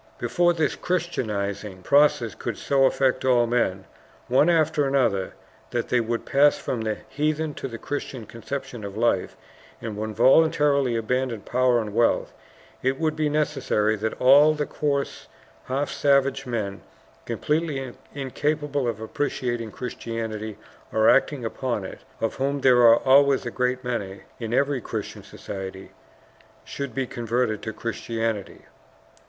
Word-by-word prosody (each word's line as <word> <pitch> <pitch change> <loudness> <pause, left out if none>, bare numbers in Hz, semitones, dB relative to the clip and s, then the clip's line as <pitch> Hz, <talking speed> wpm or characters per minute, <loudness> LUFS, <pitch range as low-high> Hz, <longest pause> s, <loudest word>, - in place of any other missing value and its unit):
"Before 175 +9 +2
this 160 -2 0
Christianizing 105 - -3
process 140 -3 +3
could 115 -3 -5
so 135 -1 +2
affect 130 -1 +2
all 125 -2 +4
men 95 -6 0 0.4
one 135 +6 +4
after 155 -3 +2
another 125 -9 +1 0.3
that 120 -1 -2
they 125 - +3
would 115 0 -2
pass 145 +1 +4
from 120 - -3
the 110 -1 -2
heathen 155 +1 -1
to - - -5
the 115 -3 -7
Christian 130 -3 -5
conception 120 0 -6
of 100 0 -7
life, 110 -5 0 0.4
and 110 -2 -5
would 110 0 -4
voluntarily 140 0 +4
abandon 120 0 -1
power 125 +2 +2
and 105 -2 -4
wealth, 115 +1 +2 0.5
it 130 +1 0
would 155 -1 0
be 155 -1 0
necessary 110 -8 +1
that 110 +1 -3
all 145 +4 +6
the 150 -1 -1
coarse, 140 -2 -2 0.4
half 135 +3 -2
savage 140 -1 +2
men, 105 -5 -3 0.4
completely 150 -5 -2 0.2
incapable 145 0 -1
of 115 -3 -2
appreciating 120 -1 -2
Christianity 110 -2 -5 0.3
or 110 0 +5
acting 135 -2 +2
upon 115 -3 -3
it, - - -8 0.2
of 115 - -1
whom 140 +1 -1
there 125 -2 +5
are 115 -1 +8
always 140 0 +4
a - - -3
great 125 0 -1
many 100 -6 -4 0.2
in 115 -2 -4
every 140 +1 +1
Christian - - -5
society, 95 -1 -8 0.7
should 140 -2 -6
be 135 -1 0
converted 120 -3 -1
to 110 - -4
Christianity. 115 -1 -4
125 Hz, 140 wpm, -24 LUFS, 110-140 Hz, 0.7 s, are